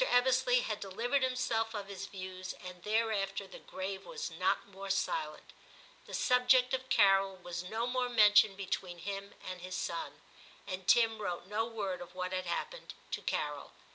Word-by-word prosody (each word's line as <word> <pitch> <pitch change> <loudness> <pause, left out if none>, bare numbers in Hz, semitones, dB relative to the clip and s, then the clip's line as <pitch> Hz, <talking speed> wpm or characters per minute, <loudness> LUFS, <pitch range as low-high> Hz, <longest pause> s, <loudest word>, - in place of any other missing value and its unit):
Ebbesley 250 - +4
had 215 -1 -2
delivered 230 +8 0
himself 235 -3 0
of 205 -1 -3
his 200 -2 -6
views, 185 -1 -6
and 180 -2 -10
thereafter 210 -2 0
the - - -11
grave 190 +1 -5
was 485 -1 -5
not - - +1
more 195 0 -8
silent; 480 - -2 0.5
the - - -10
subject 250 0 +4
of 260 0 -1
Carol 195 -3 +5
was 175 -2 -5
no 220 +6 -2
more 250 0 0
mentioned 210 -3 +6
between 185 -2 -3
him 200 +3 -5
and 185 -1 -5
his 185 +1 -5
son. 170 - -4 0.5
And 185 -2 -5
Tim 225 -2 +5
wrote 175 -3 -3
no 210 +4 -1
word 200 -6 -3
of 175 +1 -10
what 185 0 -3
had 185 -1 -2
happened - - -4 0.2
to - - -2
Carol. - - -2
200 Hz, 170 wpm, -33 LUFS, 185-240 Hz, 0.5 s, mentioned